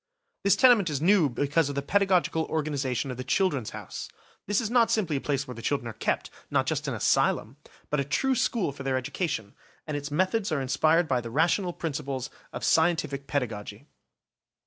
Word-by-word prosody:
This 200 0 +5
tenement 235 -6 +5
is 145 -3 -1
new 180 +2 +4
also - - +1
because 145 +1 +1
of 140 - -4
the 140 - -2
pedagogical 185 -2 +2
organisation 140 -4 -2
of 125 - -6
the 125 - -4
"Children's 140 - 0
House". - - -7 0.4
This 205 0 +2
is 225 -3 -2
not 240 -2 +4
simply 180 -9 +1
a - - -4
place 140 -1 -1
where 125 - -6
the 115 - -9
children 140 -1 -1
are 115 - -5
kept, 110 - -2 0.2
not - - +1
just - - -2
an - - -1
asylum, 120 +6 +1 0.3
but 150 - +1
a - - +2
true 265 - +1
school 225 - 0
for 140 - -10
their 135 -1 0
education, 130 - -3 0.3
and 155 - -4
its 145 +1 -4
methods 185 +6 0
are 155 - +1
inspired 155 +5 +2
by 130 -4 +1
the 115 - -7
rational 170 - +1
principles 140 -6 -4 0.2
of - - -6
scientific 150 -4 +1
pedagogy. 115 -8 -3
150 Hz, 195 wpm, -27 LUFS, 135-180 Hz, 0.4 s, This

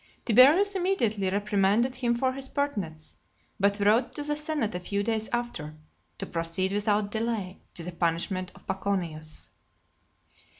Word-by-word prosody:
Tiberius 290 - +6
immediately 240 - +1
reprimanded 205 +4 +2
him 245 -2 0
for 260 +2 +1
his 270 0 -6
pertness; 190 - -3 0.4
but 200 +1 +2
wrote 210 +5 +3
to 295 - -3
the 295 0 0
senate 300 -7 -1
a 180 - -2
few 200 +3 -2
days 220 0 -1
after, 240 -11 -3 0.4
to - - -3
proceed 165 +3 -1
without 205 0 +1
delay 220 -4 -2
to 170 - -6
the 180 - -4
punishment 175 +2 -1
of - - -17
Paconius. 175 -5 -3
205 Hz, 140 wpm, -28 LUFS, 185-245 Hz, 0.4 s, Tiberius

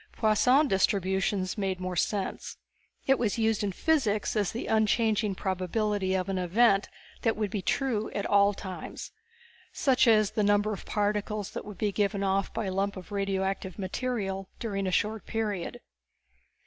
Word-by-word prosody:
Poisson 250 +6 +4
Distribution 190 -1 +1
made 190 -2 -1
more 185 0 -3
sense. 195 +3 -2 0.5
It 270 -1 +3
was 225 -3 0
used 220 -2 +1
in 200 - 0
physics 220 - +1
as 205 -3 +1
the 230 - -4
unchanging 220 -1 +2
probability 190 +1 -1
of 185 0 -1
an 195 -1 -1
event 195 +3 +3 0.3
that 225 -2 +1
would 210 -3 -1
be 205 - -2
true 225 0 0
at 200 - -1
all 200 0 +4
times. 190 -2 -7 0.6
Such 265 -3 +3
as 215 -2 +5
the 215 - 0
numbers 205 0 +2
of - - -13
particles 210 0 -1
that - - -6
would 210 -2 -9
be 210 -1 0
given 200 0 0
off 195 0 0
by 225 -1 -3
a 190 - -2
lump 195 +1 -1
of 185 +2 -10
radioactive 195 -2 -2
matter 195 -1 -3
during 195 -4 -2
a - - 0
short 215 +3 -1
period. 210 -6 -3
205 Hz, 160 wpm, -28 LUFS, 195-220 Hz, 0.6 s, as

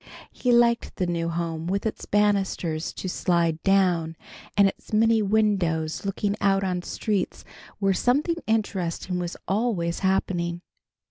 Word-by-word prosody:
He 250 - 0
liked 235 -1 +3
the 185 - -1
new 170 -1 -1
home 165 -1 -3
with 195 +3 -1
its 220 - -4
banisters 195 -6 +1
to - - -6
slide 170 -3 0
down, 180 -5 +2 0.4
and 200 -1 +6
its - - -7
many 225 +1 +4
windows 195 -7 +1
looking 200 +1 -1
out 195 -1 +3
on 180 -2 -1
streets 205 +2 -2 0.3
where 195 -1 +2
something 290 - +1
interesting 185 -5 -1
was 175 0 -4
always 195 -5 0
happening. 175 -2 0
190 Hz, 135 wpm, -25 LUFS, 170-210 Hz, 0.4 s, and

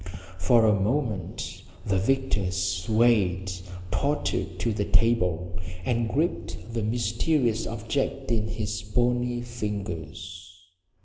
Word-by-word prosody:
For 115 +6 +5
a 105 - +5
moment 105 - -1 0.2
the 95 -1 +2
victor 120 -4 +1
swayed, 95 +1 +2 0.4
tottered 100 -10 0
to 115 +4 0
the 105 -1 -1
table, 90 -5 +2 0.3
and 120 -2 +1
gripped 140 -5 -2
the 115 - 0
mysterious 115 +2 +1
object 135 +4 -2
in 110 -2 +1
its 110 -1 -2
bony 120 +2 +1
fingers. 90 -6 -5
110 Hz, 105 wpm, -27 LUFS, 95-120 Hz, 0.4 s, For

